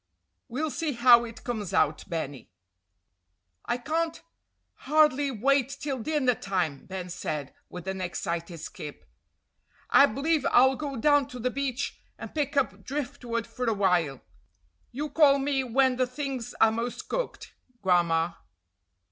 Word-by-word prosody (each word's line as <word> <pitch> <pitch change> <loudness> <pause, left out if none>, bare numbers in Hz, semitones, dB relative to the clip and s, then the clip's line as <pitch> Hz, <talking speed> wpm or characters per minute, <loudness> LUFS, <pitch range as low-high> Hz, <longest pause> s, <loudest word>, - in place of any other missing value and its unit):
"We'll 290 +5 -2
see 300 +3 -2
how 240 0 +6
it 230 -1 -10
comes 210 -6 -3
out, 155 0 +2
Benny." 145 -6 -4 1.2
"I 240 - 0
can't 320 +6 -2 0.7
hardly 295 -2 +4
wait 270 +2 +2
till 275 -3 -3
dinner 270 0 +1
time," 180 -10 -2
Ben 185 -1 -5
said, 155 -5 -4 0.2
with 180 0 -9
an 190 0 -3
excited 170 -1 -3
skip. 150 -1 -8 0.9
"I 280 - +8
b'lieve 290 +5 0
I'll 265 +2 +5
go 285 -1 -4
down 290 +2 +4
to 250 - -9
the 250 +2 -1
beach, 275 -1 -3 0.2
and - - -8
pick 290 -1 -1
up 275 - 0
driftwood 245 -4 -3
for 250 -1 -4
a 225 - +2
while. 175 -9 +1 0.7
You 290 +5 -3
call 290 -1 +5
me 275 -1 0
when 255 +1 +2
the 255 -1 +2
things 260 -2 -5
are 220 - +6
most 230 +2 -4
cooked, - - -4 0.3
Gran'ma." 170 -2 +2
245 Hz, 140 wpm, -27 LUFS, 185-280 Hz, 1.2 s, I